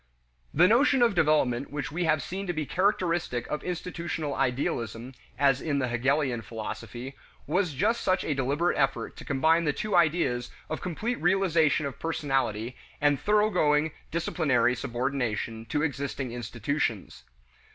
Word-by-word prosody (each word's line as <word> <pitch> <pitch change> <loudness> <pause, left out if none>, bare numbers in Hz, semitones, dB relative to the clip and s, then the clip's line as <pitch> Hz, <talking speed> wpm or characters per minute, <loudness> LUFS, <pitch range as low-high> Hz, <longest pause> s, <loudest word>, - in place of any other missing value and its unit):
The 175 +4 +5
notion 255 +4 +4
of 230 -3 +4
development 145 -7 +2
which 145 -2 -4
we 170 +3 -1
have 155 -3 +2
seen 195 +5 -5
to 175 - -1
be 155 -2 -2
characteristic 175 - 0
of 150 - -2
institutional 170 -4 -3
idealism 125 -2 -2 0.2
(as 135 -1 +3
in 145 -3 -1
the 130 -2 0
Hegelian 130 +1 +1
philosophy) 115 +4 -6 0.3
was 175 0 0
just 215 - +1
such 185 0 +1
a 150 - 0
deliberate 140 +6 0
effort 135 0 0
to - - -9
combine 160 +4 +3
the 150 - +2
two 210 +3 -2
ideas 155 -8 +2 0.2
of 155 - -3
complete 220 +8 -3
realization 170 -4 +3
of 140 - -5
personality 135 -7 -1 0.2
and 145 -2 +3
thoroughgoing 180 -8 +2 0.2
"disciplinary" 130 -7 +1
subordination 120 -2 -2
to 150 +6 0
existing 140 -3 -3
institutions. 120 -1 -3
145 Hz, 140 wpm, -28 LUFS, 125-170 Hz, 0.3 s, The